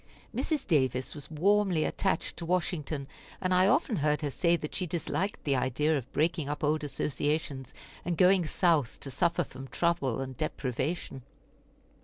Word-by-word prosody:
Mrs. 305 -4 -1
Davis 130 - +1
was 145 -2 -8
warmly 185 +1 +2
attached 190 - -1
to 170 - -5
Washington, 160 -5 -1 0.3
and 185 -1 0
I 185 +1 +5
often 255 - +2
heard 150 0 +1
her 145 - -1
say 170 +4 +3
that 150 -2 -5
she 180 - -2
disliked 170 +3 -2
the 140 -2 +2
idea 130 +5 +1
of 135 -1 -4
breaking 160 -1 0
up 150 - -4
old 150 +1 +1
associations, 145 -2 -2 0.3
and 175 -1 -2
going 185 -2 +5
South 160 -8 +2
to 135 - -5
suffer 170 +5 +1
from 135 -2 -10
trouble 140 -7 0
and 130 -1 -4
deprivation. 140 0 -3
155 Hz, 160 wpm, -30 LUFS, 140-175 Hz, 0.3 s, I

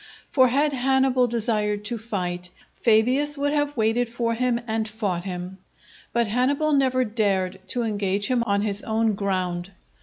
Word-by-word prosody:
For 260 -2 +5
had 285 +4 +2
Hannibal 265 -1 +2
desired 210 -3 -1
to 235 +1 -3
fight, 180 -5 -3 0.2
Fabius 255 +6 +2
would 285 +1 0
have 290 -1 0
waited 225 +2 +1
for 230 0 -1
him 240 0 0
and 220 -1 -1
fought 200 -5 -3
him. 180 0 -6 0.5
But 235 +1 +2
Hannibal 275 +7 +1
never 260 -2 +2
dared 195 -4 0
to 240 +5 -1
engage 205 -2 0
him 250 +2 +2
on 200 0 +1
his 205 -1 0
own 220 0 0
ground. 185 -3 -2
225 Hz, 155 wpm, -24 LUFS, 200-255 Hz, 0.5 s, For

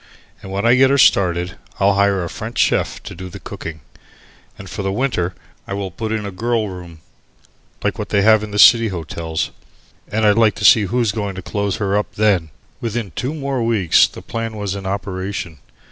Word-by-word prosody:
And 95 - -9
when 100 +3 -2
I 120 - +6
get 130 +1 +5
her 140 - +3
started, 90 -7 +3 0.2
I'll 100 +1 +4
hire 100 -1 +2
a - - -3
French 110 +7 -7
Chief - - +1
to - - -8
do 95 +2 -8
the - - -10
cooking, 80 -1 -8 0.8
and 95 - -10
for 100 - -5
the 95 0 -1
winter 95 -6 -1 0.3
I 95 - -3
will 100 -2 -4
put 110 +5 -4
in 110 -2 -2
a 100 - -5
'girl 110 +2 -1
room,' 85 -3 -10 0.8
like - - -1
what - - -4
they 100 -1 +2
have 110 0 +6
in 105 - -6
the 105 - -4
city 115 +2 +7
hotels. 80 -3 -4 0.6
And 110 +2 0
I'd 105 +1 +4
like 110 -2 +4
to 105 - -3
see 105 -1 +7
who's 115 +2 +1
going 100 -2 -4
to 95 - -7
close 100 0 -2
her 100 -2 -1
up 105 - -2
then." 100 -7 +2 0.3
Within 115 -4 -3
two 130 - -3
more 140 -4 -2
weeks 110 -7 +4
the - - -12
plan 115 -1 -4
was 100 -2 -3
in 100 -1 -6
operation. 95 -3 -4
100 Hz, 205 wpm, -19 LUFS, 95-110 Hz, 0.8 s, city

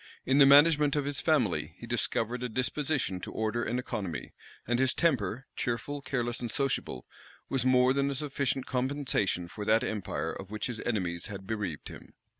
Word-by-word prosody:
In 135 +2 +3
the 140 - +9
management 145 0 +6
of 145 -2 0
his 145 -1 -2
family - - +1
he - - -9
discovered 120 +2 -1
a 125 - -2
disposition 130 -3 0
to - - -7
order 110 +2 -1
and 120 - -1
economy; 95 -9 -4 0.3
and 120 +1 0
his 130 0 +2
temper, 130 - +1
cheerful, 140 +4 -2
careless, 120 -3 -2
and 120 - -3
sociable, 125 - -1 0.4
was 130 -2 +1
more 130 0 +5
than 140 0 +1
a 140 - -2
sufficient 140 -2 -1
compensation 125 -9 0
for 105 +4 -7
that 110 +3 +4
empire 105 -7 -3
of 95 - -8
which 105 0 -4
his 120 -3 -4
enemies 90 -7 -1
had 100 -2 -8
bereaved 100 -7 -4
him. - - -12
125 Hz, 180 wpm, -30 LUFS, 110-140 Hz, 0.4 s, the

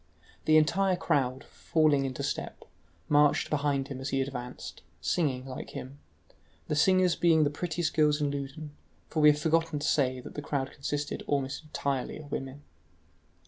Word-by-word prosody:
The 155 0 +6
entire 185 +5 +3
crowd, 130 -6 0
falling 150 -4 +1
into 130 -2 -4
step, - - -4 0.4
marched 145 0 +3
behind 145 -2 0
him 135 -2 -6
as 135 - -3
he 135 - 0
advanced, 125 -2 -5 0.2
singing 135 -7 0
like 130 -1 -7
him, 135 +3 -8 0.7
the 150 - -1
singers 185 +2 +4
being 165 -2 +4
the 145 - +1
prettiest 165 +1 -2
girls 150 -1 +3
in 145 -1 0
Loudun, 145 +2 -6 0.4
for 160 - -1
we 150 - +8
have 150 - +4
forgotten 165 0 +1
to 145 - -2
say 130 -3 +2
that 125 - -10
the 145 - -5
crowd 140 -2 -2
consisted 145 +1 -3
almost 140 -1 -1
entirely 140 -3 -2
of 145 -2 -11
women. 135 +2 -5
145 Hz, 165 wpm, -29 LUFS, 135-155 Hz, 0.7 s, we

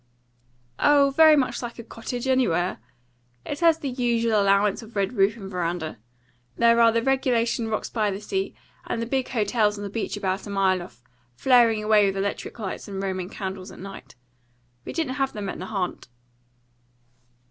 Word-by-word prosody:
"Oh, 285 -1 +4
very 315 -1 +8
much 270 -4 0
like 235 -1 -6
a 235 - -7
'cottage' 235 +2 -6
anywhere. 185 - +1 0.7
It 290 - -4
has 330 -2 +4
the 285 -4 -4
usual 235 -3 +1
allowance 200 +1 +2
of 225 0 -14
red 200 +3 0
roof 205 0 +2
and 195 -4 -8
veranda. 170 - -3 0.6
There 235 0 +5
are 230 0 +6
the 230 0 0
regulation 245 -3 +1
rocks 215 -1 -2
by 215 -3 0
the 195 0 -4
sea; 385 - -3 0.3
and - - -2
the 230 - -2
big 260 +2 -1
hotels 210 -2 +1
on 205 - -6
the 200 - -5
beach 220 -1 -3
about 195 0 -2
a - - -7
mile 190 -2 +2
off, 120 -8 -13 0.3
flaring 230 - +4
away 210 -1 +4
with 195 0 -2
electric 200 +4 -3
lights 205 -5 -5
and 195 -2 -5
roman 190 -2 -3
candles 190 -1 -6
at - - -12
night. 185 -10 -10 0.7
We - - -5
didn't 290 -5 -2
have 270 - 0
them 205 -2 -4
at - - -6
Nahant." 185 -1 -4
215 Hz, 180 wpm, -25 LUFS, 195-245 Hz, 0.7 s, very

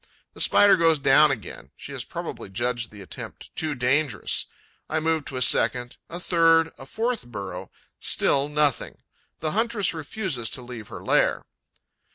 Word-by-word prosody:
The - - -6
Spider 205 -1 +6
goes 165 -2 +4
down 145 +2 +5
again: 135 -6 -5
she - - -9
has - - -5
probably - - -7
judged 120 +3 -2
the 105 -2 -11
attempt - - -8
too 155 -2 -2
dangerous. 130 -1 +1 0.4
I 160 - 0
move 160 -1 0
to 135 - -6
a 125 - +3
second, 120 0 +2
a 175 - -5
third, 165 -2 +3
a 135 - -10
fourth 230 - -2
burrow: 100 -6 -7 0.3
still 140 +1 +1
nothing; 150 -3 0 0.4
the 155 - -1
huntress 225 -2 +1
refuses 160 - -3
to 125 - -6
leave 120 -3 -9
her - - -9
lair. - - +2
145 Hz, 160 wpm, -25 LUFS, 120-165 Hz, 0.4 s, Spider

